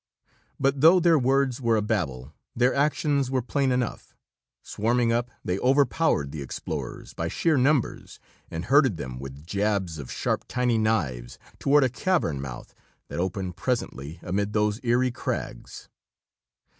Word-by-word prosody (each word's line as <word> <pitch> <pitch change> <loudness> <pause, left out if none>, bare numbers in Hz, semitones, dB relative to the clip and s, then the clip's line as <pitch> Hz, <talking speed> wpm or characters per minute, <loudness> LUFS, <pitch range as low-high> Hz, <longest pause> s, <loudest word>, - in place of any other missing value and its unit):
But 135 0 +1
though 165 +4 +7
their 170 -3 +4
words 135 0 +1
were 115 -2 +2
a - - +1
babel, 75 - -2 0.2
their 125 +2 +3
actions 140 -1 +1
were 130 -2 0
plain 135 +1 0
enough. 125 -2 -2 0.5
Swarming 115 +2 +1
up, 120 +1 0 0.2
they 90 +2 -1
overpowered 135 - +2
the 75 - -6
explorers 70 - -6
by 85 - -3
sheer 160 - +1
numbers, 135 -1 +1 0.3
and 80 +2 -5
herded 135 - +4
them 65 -4 -6
with 70 +2 -9
jabs 100 -3 -1
of 65 - -7
sharp, - - -1
tiny 125 -2 +1
knives 70 - -1 0.2
toward 145 +1 +4
a - - +4
cavern 125 - 0
mouth 65 -3 -8 0.4
that - - -4
opened 90 0 -3
presently 85 - -3
amid 100 +3 -1
those 105 0 +1
eery 125 +1 +2
crags. - - -5
115 Hz, 145 wpm, -26 LUFS, 85-135 Hz, 0.5 s, though